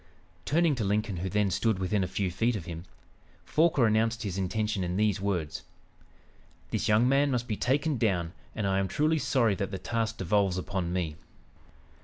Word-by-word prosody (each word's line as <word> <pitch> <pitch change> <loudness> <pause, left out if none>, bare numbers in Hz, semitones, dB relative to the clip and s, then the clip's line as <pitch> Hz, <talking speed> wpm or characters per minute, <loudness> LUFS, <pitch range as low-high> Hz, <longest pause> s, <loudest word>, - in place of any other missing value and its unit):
Turning 165 +1 +3
to 125 -5 -2
Lincoln 105 -1 0
who 95 +3 -3
then 105 0 +1
stood 110 +3 +1
within 95 +1 0
a - - -1
few 95 0 -2
feet 115 +6 +1
of 95 -6 -5
him, 85 -1 -7 0.6
Forquer 155 -5 +3
announced 115 +2 +1
his 100 -4 -3
intention 100 +1 -1
in 90 0 -2
these 105 -2 +1
words: 90 -7 -2 1.1
"This 115 - -1
young 110 +3 +4
man 140 +2 +3
must 125 -2 -1
be 110 - -1
taken 140 +4 0
down, 90 -7 0 0.2
and 110 - -2
I 95 0 +2
am 95 - 0
truly 155 - +1
sorry 120 -7 +2
that 100 +1 -3
the 95 - -4
task 115 +2 -2
devolves 95 -1 +1
upon 95 -1 -2
me." 85 -4 -2
105 Hz, 185 wpm, -29 LUFS, 95-115 Hz, 1.1 s, young